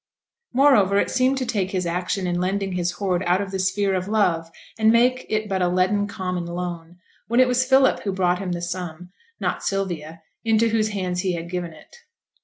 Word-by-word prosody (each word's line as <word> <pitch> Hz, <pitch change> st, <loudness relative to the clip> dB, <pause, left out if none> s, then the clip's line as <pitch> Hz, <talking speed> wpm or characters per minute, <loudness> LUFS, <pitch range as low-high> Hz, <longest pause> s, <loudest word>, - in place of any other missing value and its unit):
Moreover, 240 Hz, -8 st, +4 dB
it -, -, +1 dB
seemed 260 Hz, +1 st, +2 dB
to 260 Hz, -, -1 dB
take 195 Hz, -5 st, -1 dB
his 185 Hz, -2 st, -2 dB
action 180 Hz, +2 st, -2 dB
in 175 Hz, 0 st, -1 dB
lending 195 Hz, +1 st, -1 dB
his 180 Hz, -1 st, -1 dB
hoard 185 Hz, -1 st, -1 dB
out 180 Hz, +2 st, +3 dB
of 200 Hz, -1 st, -4 dB
the 190 Hz, -, -3 dB
sphere 195 Hz, +1 st, +1 dB
of 185 Hz, 0 st, -2 dB
love, 180 Hz, -6 st, +1 dB, 0.3 s
and 220 Hz, 0 st, +5 dB
make 250 Hz, +2 st, +2 dB
it 215 Hz, 0 st, -1 dB
but 190 Hz, -2 st, -1 dB
a 180 Hz, -, +3 dB
leaden 185 Hz, +3 st, +1 dB
common 180 Hz, -3 st, -4 dB
loan, 175 Hz, -1 st, -6 dB, 0.3 s
when 235 Hz, +2 st, +2 dB
it 255 Hz, -, +6 dB
was 250 Hz, +1 st, +2 dB
Philip 265 Hz, 0 st, +4 dB
who 200 Hz, -, -3 dB
brought 180 Hz, -1 st, +1 dB
him 185 Hz, -2 st, -3 dB
the 175 Hz, 0 st, -4 dB
sum, 175 Hz, 0 st, -6 dB, 0.3 s
not -, -, -2 dB
Sylvia, 170 Hz, -5 st, -3 dB, 0.2 s
into 225 Hz, 0 st, +3 dB
whose 220 Hz, -1 st, +1 dB
hands 185 Hz, -3 st, -2 dB
he 185 Hz, 0 st, 0 dB
had 170 Hz, 0 st, -5 dB
given 175 Hz, -2 st, -3 dB
it. 160 Hz, -, -16 dB
190 Hz, 205 wpm, -23 LUFS, 175-215 Hz, 0.3 s, it